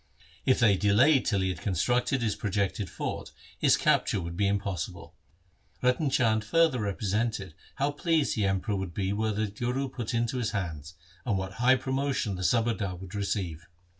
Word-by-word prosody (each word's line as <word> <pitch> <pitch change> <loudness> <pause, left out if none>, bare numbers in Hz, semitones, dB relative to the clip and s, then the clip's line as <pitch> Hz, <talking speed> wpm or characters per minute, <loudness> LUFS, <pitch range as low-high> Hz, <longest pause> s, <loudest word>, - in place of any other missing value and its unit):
If 130 - +5
they 105 -5 +4
delayed 120 +9 +4
till 100 -3 +2
he 95 - +1
had 90 -2 -4
constructed 120 - +1
his 105 -3 0
projected 100 -1 -1
fort, - - -5 0.3
his - - +4
capture - - +2
would 85 -1 -5
be 100 +2 +1
impossible. 100 -5 -3 0.7
Ratan 125 +4 +2
Chand 110 -4 +2
further 160 +2 +3
repre 100 -1 -3
sented 110 -5 -1 0.2
how 140 +1 0
pleased 160 0 +1
the 105 -3 +1
Emperor 95 +2 0
would 95 -3 -4
be 95 0 -1
were 110 +1 0
the 105 +1 0
Guru 125 +6 -2
put 120 -3 -4
into 120 +2 0
his 115 - -2
hands, 85 -5 -4 0.3
and 110 -6 0
what 95 0 -4
high 130 +2 +6
promotion 130 -4 -1
the 90 - -5
subadar 110 -2 +1
would 95 +1 -10
receive. 95 -5 -3
105 Hz, 175 wpm, -28 LUFS, 95-125 Hz, 0.7 s, high